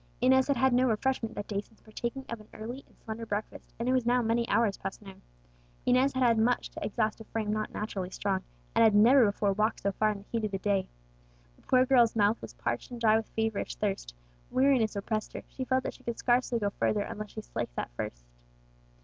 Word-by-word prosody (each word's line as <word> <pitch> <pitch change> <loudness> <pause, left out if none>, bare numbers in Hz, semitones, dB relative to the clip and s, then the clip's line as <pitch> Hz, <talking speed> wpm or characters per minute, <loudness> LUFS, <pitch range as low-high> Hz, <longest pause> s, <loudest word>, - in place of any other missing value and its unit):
Inez 260 0 +4
had 280 -3 +1
had 260 +1 +3
no 250 +1 +4
refreshment 225 0 -1
that 205 - -5
day 200 -1 -1
since 220 +1 -25
partaking 235 +4 -5
of 235 - -5
an 215 - -17
early 240 +5 -6
and - - -26
slender 225 +1 -7
breakfast, 210 -1 -5
and 235 - -3
it - - +3
was 255 -1 +2
now 245 +2 +3
many 230 +1 +1
hours 220 -4 +3
past 195 - -6
noon. 195 -2 -13 0.6
Inez 255 +2 +3
had 260 0 +1
had 230 -2 +4
much 240 +3 +1
to - - -7
exhaust 215 +1 -1
a - - -7
frame 215 -1 -2
not 215 0 -2
naturally 195 -4 -4
strong, 190 0 -1 0.3
and - - +5
had 220 -2 +5
never 240 +4 +7
before 200 0 +1
walked 215 +3 0
so 200 - +1
far 215 +2 +1
in 210 - -2
the 200 - -13
heat 230 -1 -1
of 215 - 0
the 195 - -2
day. 195 -1 0 0.7
The - - -25
poor 255 0 +3
girl's 245 -4 +4
mouth 210 +1 +2
was - - -9
parched - - -3
and 245 -1 -7
dry 220 -2 +4
with 220 0 -1
feverish 220 - -1
thirst; - - -3 0.3
weariness 255 -5 +3
oppressed 215 +2 -3
her; - - -6
she 260 - -6
felt 260 0 +1
that - - -3
she - - -18
could 235 -1 -3
scarcely 245 -1 +2
go 205 -3 -1
further 210 +1 0
unless 210 +1 -5
she - - -5
slaked - - -5
that - - -4
thirst. - - -5
220 Hz, 235 wpm, -29 LUFS, 205-245 Hz, 0.7 s, never